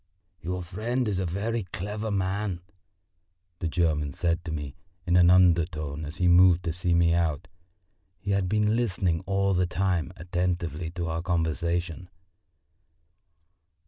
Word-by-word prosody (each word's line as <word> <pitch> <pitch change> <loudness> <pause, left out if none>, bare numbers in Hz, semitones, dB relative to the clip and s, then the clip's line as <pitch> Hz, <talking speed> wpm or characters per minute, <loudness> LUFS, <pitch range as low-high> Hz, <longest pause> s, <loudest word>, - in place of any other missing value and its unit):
"Your 90 +1 -3
friend 115 +8 -2
a 95 -3 -1
very 110 +7 -2
clever 105 +5 -4
man!" 95 -1 -1 1.0
the 85 - -2
German 75 -4 0
said 85 +2 -1
to 80 - -4
me 75 -3 -5 0.3
in 90 -1 +2
an 90 -1 +6
undertone 85 -4 +2
as 75 +4 -8
he 90 - +2
moved 90 0 +6
to 85 -2 -2
see 90 0 0
me 85 -1 +4
out; 85 -1 0 0.7
he 100 +4 -4
had 100 -2 +1
been 105 +1 +2
listening 95 -8 0
all 100 0 +1
the 90 0 +1
time 90 -2 -1
attentively 85 -1 -2
to 85 0 -4
our 80 0 -2
conversation. 85 +1 -2
90 Hz, 140 wpm, -27 LUFS, 85-95 Hz, 1.0 s, an